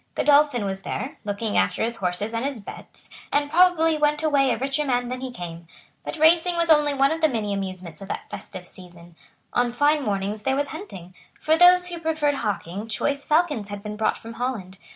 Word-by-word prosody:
Godolphin 290 -6 +3
was 195 0 -3
there, - - -5
looking 205 +1 -2
after - - 0
his 230 +1 -2
horses 195 +3 -2
and 230 +1 -2
his 275 -3 -3
bets, 200 - -10 0.2
and 290 0 0
probably 325 -2 +4
went 295 +1 +1
away 280 -3 +3
a - - +1
richer 275 +3 -1
man 245 -3 0
than 255 0 -5
he 260 - -4
came. 170 -7 -8 0.4
But - - -5
racing 335 +3 +4
was 335 -1 +2
only 300 -1 +5
one 275 +1 +3
of 325 0 -2
the 315 - +4
many 215 -5 -2
amusements 185 -4 -6
of 195 - -8
that - - -5
festive 195 -3 -9
season. 175 -2 -15 0.4
On 245 0 +1
fine 290 +5 +2
mornings 205 -2 -2
there 265 +3 0
was 285 +1 -1
hunting. 190 - -9 0.3
For 315 - +2
those 360 +1 +6
who 345 -1 -6
preferred 315 -3 0
hawking 200 -1 -3
choice 280 +5 -2
falcons 300 - +1
had 205 0 -7
been 210 -1 -5
brought 215 0 0
from 230 +1 -10
Holland. 225 -6 -4
250 Hz, 205 wpm, -24 LUFS, 200-300 Hz, 0.4 s, those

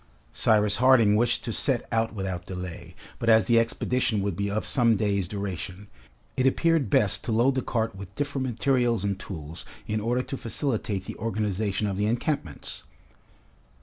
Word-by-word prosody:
Cyrus 105 -2 +3
Harding 120 -4 +5
wished 120 +2 +2
to 115 - -3
set 130 0 +1
out 115 -1 +1
without 95 -4 -4
delay; 90 -2 -7 0.2
but 115 - 0
as 110 -3 +6
the 115 +2 +4
expedition 115 -1 0
would 100 -3 -1
be 100 +2 -1
of 105 +2 -2
some 120 -4 +3
days 100 -2 0
duration, 100 0 -5 0.5
it 130 - +2
appeared 160 -2 +2
best 100 +1 +2
to 120 - -2
load 120 +5 +3
the 130 - 0
cart 115 -3 -2
with 95 -1 -10
different 140 -2 -2
materials 120 -3 +1
and 100 -1 -1
tools 85 -5 -7 0.2
in 110 0 -1
order 120 +4 0
to 135 - -5
facilitate 110 -6 -2
the - - -7
organization 105 -1 -1
of 100 -2 -2
the 105 +1 +1
encampments. 115 - -2
110 Hz, 170 wpm, -26 LUFS, 100-120 Hz, 0.5 s, as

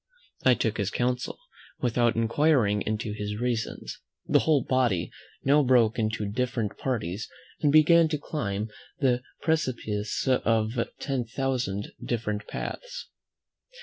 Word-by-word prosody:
I 130 -1 +6
took 110 -2 -1
his 100 -3 0
counsel, 125 +2 -1 0.4
without 120 -1 +2
inquiring 115 -2 +3
into 110 -1 -2
his 105 0 -4
reasons. 120 -2 -3 0.2
The - - +4
whole 150 -5 +3
body 120 -9 +1 0.3
now 145 +2 +5
broke 125 -4 +4
into 110 -1 -1
different 115 0 -2
parties, 110 -6 -2 0.3
and 145 - +3
began 160 +2 +6
to 155 -1 -1
climb 110 -8 -3 0.3
the 125 -4 +2 0.2
precipice 120 -9 -1
by 115 -2 +1
ten 135 -4 -1
thousand 120 -5 -2
different 105 -3 -2
paths. - - -6
120 Hz, 120 wpm, -27 LUFS, 110-135 Hz, 0.4 s, I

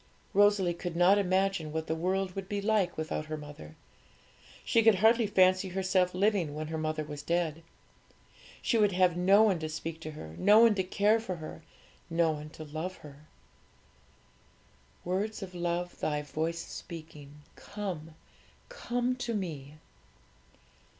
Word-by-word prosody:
Rosalie 205 -3 +4
could 170 0 -6
not 180 +4 +5
imagine 190 -4 0
what 160 +1 -3
the 160 - -1
world 185 +3 -1
would 195 0 -6
be 205 -2 -1
like 200 -3 +1
without 155 -1 -3
her 155 0 -4
mother. 145 - -11 0.9
She 230 - +3
could 225 -2 +6
hardly 225 +3 +4
fancy 185 -1 +3
herself 185 -1 +1
living 185 -6 +1
when 155 0 -5
her 160 - -3
mother 155 0 -2
was 150 -1 -7
dead. 165 -1 -1 1.0
She 230 - +2
would 205 -2 +3
have 180 -1 +3
no 195 +4 +5
one 195 -6 +2
to 155 -1 -4
speak 160 +1 -5
to 155 - -7
her, 80 - -9
no 205 +3 +6
one 230 -1 +7
to 190 -2 0
care 205 +4 +2
for 220 -5 -4
her, 160 0 -9 0.5
no 165 -1 +2
one 150 0 -6
to 155 - -10
love 160 +5 -5
her. 145 +1 -13 1.8
'Words 200 +4 -2
of 185 -1 -8
love 175 0 -3
Thy 150 -1 -1
voice 160 +3 -3
is - - -13
speaking, 150 -3 -10
'Come, 170 -7 -6 0.5
come 245 - -2
to 235 -2 -3
Me."' 150 -7 -5
180 Hz, 155 wpm, -30 LUFS, 155-200 Hz, 1.8 s, one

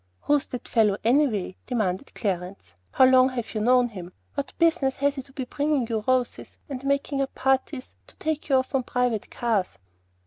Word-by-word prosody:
"Who's 290 -1 +1
that 250 -1 -7
fellow 210 -4 +3
anyway?" 230 -7 +1
demanded 215 -2 -2
Clarence. 180 - -4 0.2
"How 260 - +5
long 255 0 +6
have 240 -4 -5
you 215 - -2
known 250 +2 +4
him? 180 -4 -9 0.2
What 280 -1 -4
business 325 -6 +2
has 280 +1 +2
he 275 - -5
to 270 - -18
be 265 -1 -5
bringing 285 -1 0
you 220 -2 -2
roses, 255 -1 -1
and 270 -3 -6
making 280 0 0
up 270 - -3
parties 265 0 -1
to - - -16
take 310 -1 -3
you 270 - +4
off 260 +1 0
on 270 - +2
private 245 -3 -1
cars?" 225 -6 -1
255 Hz, 185 wpm, -25 LUFS, 220-275 Hz, 0.2 s, long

